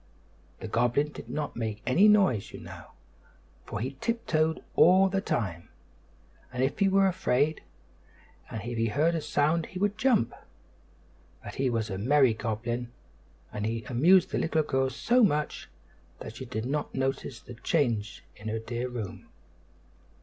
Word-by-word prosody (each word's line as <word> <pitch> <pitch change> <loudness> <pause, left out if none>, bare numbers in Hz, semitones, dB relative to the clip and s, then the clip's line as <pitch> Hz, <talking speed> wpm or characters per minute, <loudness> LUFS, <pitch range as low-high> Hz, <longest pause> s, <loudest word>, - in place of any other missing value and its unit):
The - - -6
goblin 120 +6 +1
did 115 - -10
not 145 +3 -3
make 110 -2 -4
any 175 - +5
noise, 195 - +3
you - - -8
know, - - -10 0.8
for - - -5
he 130 +4 -4
tiptoed 160 -9 0
all 190 +3 +6
the 195 0 0
time, 90 - -3 0.8
as 125 0 -3
if 135 +6 0
he 200 -1 +4
were 195 0 +4
afraid; 155 -5 +1 0.9
and 110 - -6
if 120 0 -4
he 115 - +2
heard 155 +9 +2
a 165 - -1
sound 155 +3 +1
he 185 - -8
would 205 +2 0
jump. 240 - +2 1.1
But - - -8
he 135 -1 0
was 115 -3 -2
a 95 - -3
merry 130 +2 +4
goblin, 120 +2 -3 0.6
and 105 - -4
he 115 +1 -2
amused 165 - +4
the - - 0
little 160 -1 +1
girl 135 -2 0
so 245 - +2
much 150 -7 0 0.5
that 110 - -9
she 130 - -6
did 115 -2 -4
not 145 +3 -3
notice 135 -2 -2
the 120 - -11
change 115 -5 -1
in 105 - -10
her 110 +1 -1
dear 120 +2 -4
room. 115 -6 -6
130 Hz, 160 wpm, -28 LUFS, 115-160 Hz, 1.1 s, all